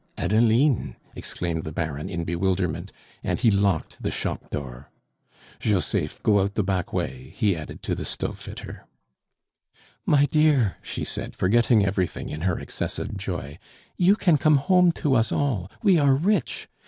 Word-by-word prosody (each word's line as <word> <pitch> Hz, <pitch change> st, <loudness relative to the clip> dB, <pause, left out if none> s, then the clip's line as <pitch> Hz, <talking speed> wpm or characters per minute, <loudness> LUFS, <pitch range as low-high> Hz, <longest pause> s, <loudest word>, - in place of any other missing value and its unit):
"Adeline!" 115 Hz, +7 st, +2 dB, 0.2 s
exclaimed 85 Hz, -2 st, -3 dB
the 80 Hz, -, -6 dB
Baron 80 Hz, -2 st, -3 dB
in 85 Hz, -1 st, -3 dB
bewilderment, 90 Hz, 0 st, -1 dB, 0.3 s
and -, -, 0 dB
he 115 Hz, -, +4 dB
locked 100 Hz, -4 st, 0 dB
the -, -, -1 dB
shop -, -, -4 dB
door. 65 Hz, -2 st, -6 dB, 0.7 s
"Joseph, 100 Hz, -5 st, -1 dB
go 105 Hz, -2 st, +4 dB
out 100 Hz, +1 st, -1 dB
the 105 Hz, -, +1 dB
back 95 Hz, -2 st, -1 dB
way," 125 Hz, +9 st, -4 dB
he 105 Hz, -5 st, +2 dB
added 75 Hz, -2 st, -8 dB
to -, -, -1 dB
the -, -, -3 dB
stove -, -, -4 dB
fitter. -, -, -9 dB, 1.2 s
"My 145 Hz, -1 st, +4 dB
dear!" 145 Hz, -8 st, +3 dB
she -, -, -4 dB
said, -, -, -6 dB
forgetting 110 Hz, +2 st, +3 dB
everything 95 Hz, -3 st, -2 dB
in 75 Hz, -, -5 dB
her 90 Hz, -1 st, 0 dB
excessive -, -, -4 dB
joy, 90 Hz, -5 st, -5 dB, 0.4 s
"you 185 Hz, +3 st, +4 dB
can 175 Hz, -8 st, +3 dB
come 155 Hz, +1 st, +5 dB
home 180 Hz, +4 st, +4 dB
to 145 Hz, -5 st, 0 dB
us 115 Hz, -3 st, +2 dB
all; 110 Hz, -11 st, 0 dB
we 190 Hz, -6 st, +5 dB
are 140 Hz, -2 st, +4 dB
rich. 195 Hz, +10 st, 0 dB
100 Hz, 155 wpm, -25 LUFS, 90-140 Hz, 1.2 s, come